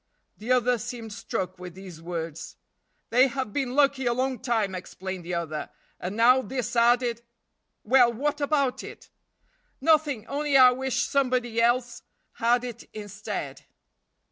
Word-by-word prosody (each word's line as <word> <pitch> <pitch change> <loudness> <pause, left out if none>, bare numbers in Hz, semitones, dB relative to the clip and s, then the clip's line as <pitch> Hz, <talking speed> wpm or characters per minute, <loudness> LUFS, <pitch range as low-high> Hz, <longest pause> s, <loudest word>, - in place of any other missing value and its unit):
The 225 +4 -5
other 250 -1 +3
seemed 230 -1 -6
struck 185 -2 -4
with 180 -1 -9
these 185 -4 -11
words. 165 -2 -6 0.6
"They 250 +3 +6
have 260 -4 -4
been 265 -3 -2
lucky 275 -3 +3
a 240 - +3
long 260 0 -1
time," 225 -6 0
explained 185 0 -6
the 175 +1 -3
other, 155 -3 -4 0.3
"and 185 +3 -4
now 245 +3 +5
this 250 -3 -4
added 240 0 +3 0.3
" - - -52
"Well, 245 +1 +5
what 290 +5 -2
about 280 -3 +1
it?" - - -11 0.7
"Nothing! 295 -6 +2
only 285 +1 +1
I 255 -1 +8
wish 260 0 -1
somebody 250 -4 0
else 240 +1 +1 0.3
had 240 +1 +1
it 240 -2 -8
instead." 205 -1 -6
240 Hz, 145 wpm, -26 LUFS, 205-260 Hz, 0.7 s, I